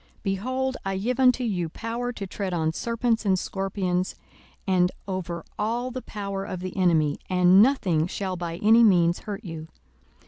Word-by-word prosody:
42:010:019 - - -32
Behold, 255 +7 -1
I 195 -1 -2
give 245 +6 -1
unto 255 -1 +4
you 180 -8 -1
power 235 +6 -4
to 205 -5 -6
tread 190 -1 -4
on 160 -1 0
serpents 230 +3 0
and 190 -3 +2
scorpions, 185 -1 -2 0.5
and 180 -2 +3 0.2
over 175 -3 -4
all 235 +4 -1
the 255 +1 -5
power 200 -3 -5
of 185 -2 -5
the 185 0 -5
enemy: 160 -6 +2
and 180 +1 +6
nothing 185 - +3
shall 190 0 -3
by 170 -2 -4
any 225 +2 +7
means 175 -5 +4
hurt 210 0 -7
you. 160 -2 -7
195 Hz, 170 wpm, -25 LUFS, 180-230 Hz, 0.5 s, any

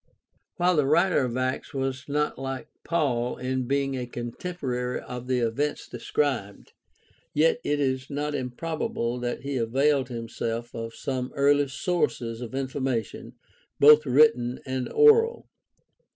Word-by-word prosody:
While 180 -1 +3
the 145 -2 +3
writer 170 +5 +4
of 125 -2 -1
Acts 130 +2 -2
was 135 0 -2
not 150 +1 0
hke 135 +1 -5 0.2
Paul 130 -8 0
in 130 0 -2
being 140 0 0
a 125 -1 -4
contemporary 125 0 -4
of 125 0 -8
the 130 -1 +1
events 120 +6 -1
described, 120 -9 -2 0.6
yet 160 +8 +3
it 145 0 0
is 130 -1 -1
not 145 +1 -2
improbable 125 -2 -3
that 120 0 -3
he 140 -1 -3
availed 135 +3 +2
himself 115 0 -4
of 115 -1 -6
some 130 -1 -3
early 145 +1 +3
sources 130 -6 -1
of 120 +1 -6
information 130 -4 -3 0.5
both 150 +1 +7
written 125 -3 +4
and 130 -1 -3
oral. 450 +1 +5
130 Hz, 135 wpm, -26 LUFS, 125-145 Hz, 0.6 s, both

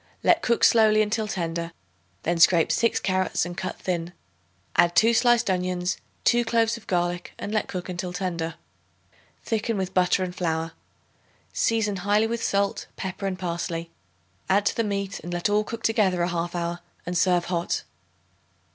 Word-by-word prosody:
Let 340 -1 +4
cook 235 -1 +1
slowly 215 -1 +6
until 215 +1 -1
tender; 170 -3 -3 0.5
then 170 +1 0
scrape 170 -1 +5
6 230 - +2
carrots 185 -3 0
and 175 0 -6
cut 185 - -4
thin; 175 -1 -3 0.6
add 175 0 +4
2 230 +4 +5
sliced 240 0 +4
onions, 180 -1 -1 0.3
2 240 0 +4
cloves 230 0 +2
of 230 - -12
garlic 175 -3 -1
and 205 - -5
let 215 - 0
cook 180 -2 -5
until 180 0 -4
tender. 170 -3 -3 0.9
Thicken 225 0 -1
with 190 -1 -3
butter 185 +1 +3
and 180 -1 -5
flour. 165 -2 -1 0.8
Season 215 -3 +1
highly 205 +4 +2
with 230 +1 -2
salt, 200 0 0
pepper 190 +1 -4
and 185 -1 -3
parsley; 170 -2 -3 0.6
add 200 +2 +3
to - - +1
the 230 - +1
meat, 200 -1 -3
and 175 - -8
let 175 +3 0
all 210 +1 +3
cook 230 +1 -7
together 190 -6 +2
a 175 - 0
half 175 0 -2
hour 170 0 -2 0.3
and 180 - -3
serve 175 -1 +3
hot. 175 -1 -1
185 Hz, 165 wpm, -25 LUFS, 175-215 Hz, 0.9 s, slowly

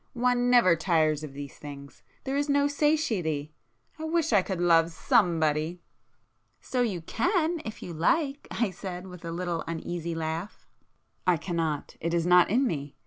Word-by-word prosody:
One 245 0 +2
never 235 -9 +6
tires 160 -3 +1
of 145 -3 -7
these 140 0 -8
things,—there 145 - -8
is 285 +1 0
no 285 0 +3
satiety! 220 - 0 0.5
I - - -5
wish 320 -3 0
I 200 - +6
could 185 -1 -4
love 165 -1 +4
somebody!" 160 -2 +1 0.8
"So 255 - -2
you 200 -8 -1
can, 320 - 0
if 220 - -7
you 175 - -6
like,"—I 275 - 0
said, 180 0 -7
with 180 -2 -11
a 165 - -5
little 170 -1 -2
uneasy 170 0 -4
laugh. 165 +4 -4 0.6
"I 180 -2 +4
cannot. 165 -3 -3
It 170 +1 -1
is 170 -1 +1
not 180 0 +6
in 250 +7 +3
me. 145 - -3
175 Hz, 155 wpm, -28 LUFS, 160-245 Hz, 0.8 s, never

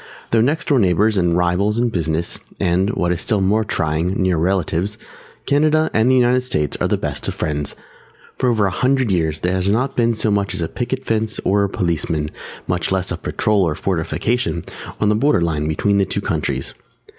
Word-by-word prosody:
Though 115 - +4
next 145 +8 0
door 140 -3 +4
neighbours 105 +2 +3
and 85 -3 +2
rivals 90 +5 +1
in 120 0 +2
business 85 -3 -2 0.2
and, 90 +3 +1
what 90 0 0
is 90 - -1
still 110 -4 +1
more 100 +3 +2
trying, 80 -1 -1
near 95 -2 +2
relatives, 90 +3 0 0.5
Canada 155 +2 +2
and 110 +3 +3
the 130 - +4
United 125 0 +3
States 75 - -1
are - - +2
the - - +1
best - - -3
of - - -3
friends. 75 -2 -3 0.6
For 125 - +1
over 110 -4 +2
a 95 - 0
hundred 130 +2 +1
years 80 -4 0
there 90 +1 0
has 95 0 0
not 120 +7 +1
been 115 -1 +2
so 110 0 0
much 100 -1 0
as 85 - -1
a - - -1
picket 130 +6 -4
fence 110 -1 -1
or 100 +1 +3
a 100 - 0
policeman, 80 -4 -1 0.3
much 90 0 -1
less 95 -1 0
a - - 0
patrol 105 -2 0
or 85 -4 +1
a - - -8
fortification, 85 +4 -1 0.4
on 105 - +2
the - - +4
border 135 0 +2
line 80 -3 0
between 100 +6 +1
the 100 - +3
two - - -3
countries. - - -2
95 Hz, 205 wpm, -19 LUFS, 85-115 Hz, 0.6 s, Though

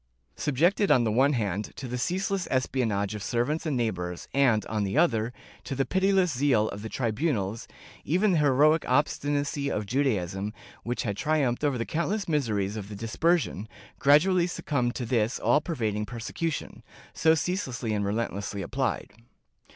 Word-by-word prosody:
^ - - -19
Subjected, 175 +9 +2
on 125 - +5
the 110 - +1
one 135 +6 +3
hand, 105 -4 -2
to 135 - -6
the 125 - -4
ceaseless 190 +6 -1
espionage 115 -6 0
of 105 - -6
ser 120 +4 0
vants 155 +4 -2
and 145 -4 0
neighbors 90 -7 -3
and, 125 -6 +3
on 110 -1 -1
the 100 +7 -2
other, 115 -9 +2 0.3
to 135 - -4
the 135 +1 +1
pitiless 190 -4 +2
zeal 125 -5 +2
of 100 - -7
the 110 - -6
tribunals, 115 - -1 0.4
even 190 +6 +2
the 175 - +3
heroic 150 +3 +4
obstinacy 145 +1 0
of 105 - -2
Judaism, 105 -5 -1 0.3
which 120 +1 -3
had 100 -3 -3
tri 155 0 +1
umphed 125 0 0
over 140 -3 +1
the 115 - -2
countless 190 +6 -1
miseries 110 - 0
of 105 -2 -6
the 105 - -7
Dispersion, 115 - 0 0.3
gradually 170 +5 +4
succumbed 125 -8 -1
to 125 - -3
this 115 0 +1
all 150 - +3
pervading 110 - -2
persecution, 120 - -4 0.3
so 160 0 +4
ceaselessly 140 - -2
and 105 -1 0
relentlessly 100 -1 -2
applied. 130 -1 -2
125 Hz, 165 wpm, -27 LUFS, 110-150 Hz, 0.4 s, on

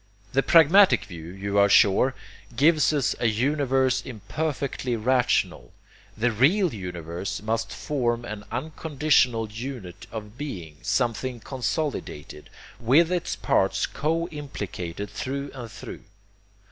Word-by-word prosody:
The 135 - +4
pragmatic 170 +7 +6
view, 85 -6 -9
you 100 +3 -2
are 100 0 +5
sure, 105 +7 +5 0.4
gives 155 +4 +4
us 145 -4 +1
a 120 - +2
universe 130 +2 +1
imperfectly 130 +1 -3
rational. 120 - +1 0.4
The 120 +2 +2
real 160 - +3
universe 90 0 -5
must 115 +1 -1
form 120 -5 -1
an 105 -2 -6
unconditional 135 -5 +1
unit 115 -6 -7
of 110 +2 -8
being, 90 - -6
something 120 +1 -1
consolidated, 130 - -4 0.3
with 140 +9 +4
its 180 -2 -1
parts - - +1
co 165 +3 -1
implicated 100 - -6
through 140 +2 -4
and 120 -4 -8
through. - - -9
125 Hz, 115 wpm, -25 LUFS, 105-145 Hz, 0.4 s, pragmatic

